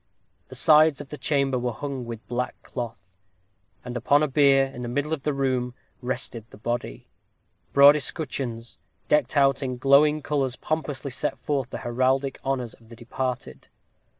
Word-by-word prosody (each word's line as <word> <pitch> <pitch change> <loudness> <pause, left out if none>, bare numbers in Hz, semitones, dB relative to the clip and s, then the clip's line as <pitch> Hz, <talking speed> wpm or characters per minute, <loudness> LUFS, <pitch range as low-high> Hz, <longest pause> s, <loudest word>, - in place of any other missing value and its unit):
The 130 - -10
sides 155 +1 +5
of 145 -2 -8
the 150 - -6
chamber 135 -2 +1
were 120 0 -1
hung 135 -1 -5
with 115 -1 -8
black 125 +1 -2
cloth, 120 -4 -5 0.9
and 125 -1 -6
upon 140 +5 +3
a - - +2
bier 135 -1 +4
in 135 -2 -9
the 120 - -4
middle 145 +6 -1
of 150 - -3
the 150 - 0
room 130 -3 -1 0.3
rested 125 -2 -3
the - - -14
body. 120 - -4 0.6
Broad 140 +1 +8
escutcheons, 130 -6 -3 0.3
decked 150 -1 +2
out 135 -1 +4
in 130 -2 -3
glowing 145 +3 +4
colors 135 -4 -1
pompously 145 -3 -3
set - - -2
forth 135 -4 -2
the - - -5
heraldic 130 +3 0
honors 130 -4 -2
of 115 -1 -20
the 115 - -11
departed. 125 +2 -5
135 Hz, 165 wpm, -25 LUFS, 125-145 Hz, 0.9 s, Broad